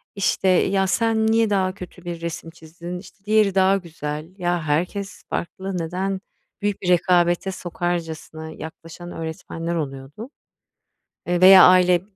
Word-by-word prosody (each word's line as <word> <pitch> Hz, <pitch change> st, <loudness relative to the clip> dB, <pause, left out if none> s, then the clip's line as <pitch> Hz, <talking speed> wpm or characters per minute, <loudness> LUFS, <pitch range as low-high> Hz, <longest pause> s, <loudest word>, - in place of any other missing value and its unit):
işte, 195 Hz, -1 st, 0 dB
"Ya, 190 Hz, +1 st, +3 dB
sen 220 Hz, +3 st, +1 dB
niye 225 Hz, 0 st, +3 dB
daha 190 Hz, -2 st, +1 dB
kötü 180 Hz, -1 st, -11 dB
bir 170 Hz, -1 st, -5 dB
resim 170 Hz, 0 st, -5 dB
çizdin? 170 Hz, +2 st, -9 dB
İşte, 195 Hz, +2 st, -16 dB
diğeri 210 Hz, -2 st, +3 dB
daha 190 Hz, +1 st, +4 dB
güzel." 155 Hz, -4 st, -6 dB
Ya, 175 Hz, -2 st, -1 dB
herkes 180 Hz, +6 st, -2 dB
farklı. 190 Hz, +2 st, -4 dB
Neden 185 Hz, +3 st, -3 dB, 0.4 s
büyük 205 Hz, -1 st, -1 dB
bir 180 Hz, -, -2 dB
rekabete 175 Hz, +1 st, +3 dB
sokarcasına 165 Hz, -3 st, -4 dB
yaklaşan 165 Hz, +2 st, -10 dB
öğretmenler 165 Hz, +1 st, -5 dB
oluyordu, 145 Hz, -, -6 dB, 1.0 s
eee, 175 Hz, 0 st, 0 dB
veya 190 Hz, 0 st, +10 dB
aile 180 Hz, -1 st, +6 dB
180 Hz, 135 wpm, -22 LUFS, 165-195 Hz, 1.0 s, veya